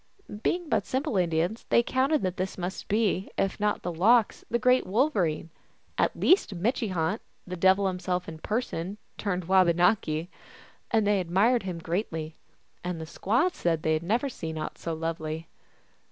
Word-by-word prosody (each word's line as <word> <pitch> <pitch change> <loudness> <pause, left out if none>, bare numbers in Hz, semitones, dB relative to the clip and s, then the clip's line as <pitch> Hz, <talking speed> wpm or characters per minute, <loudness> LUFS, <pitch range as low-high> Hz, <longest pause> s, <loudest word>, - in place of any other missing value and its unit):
Being 350 +5 0
but - - 0
simple 265 -1 -1
Indians, 175 +3 0
they - - +4
accounted 265 +4 +1
that 185 0 -1
this 190 +1 -3
must 185 +1 -5
be, 205 -3 +1
if 195 +1 0
not 210 -3 0
Lox 205 +7 +3
the 235 - +2
Great 250 0 +3
Wolverine, 185 - +1 0.4
at - - 0
least 365 - +4
Mitche 220 +4 0
hant, 180 +5 -1 0.2
the 180 - -5
devil 190 +3 +4
himself 180 -1 -1
in 160 -1 -8
person, 205 -3 -3 0.2
turned 185 -4 -2
Wabanaki; 175 -2 +3 0.6
and 220 -2 +2
they 205 -1 +3
admired 195 +8 +2
him 185 -3 -4
greatly, 165 -2 -3 0.5
and 180 -1 -3
the 160 - -5
squaws 240 - +1
said 165 -2 0
they 160 - +2
had 155 - 0
never 225 +10 0
seen 160 -11 -5
aught 155 - -5
so 165 -1 -3
lovely. 160 0 -4
185 Hz, 160 wpm, -27 LUFS, 165-220 Hz, 0.6 s, they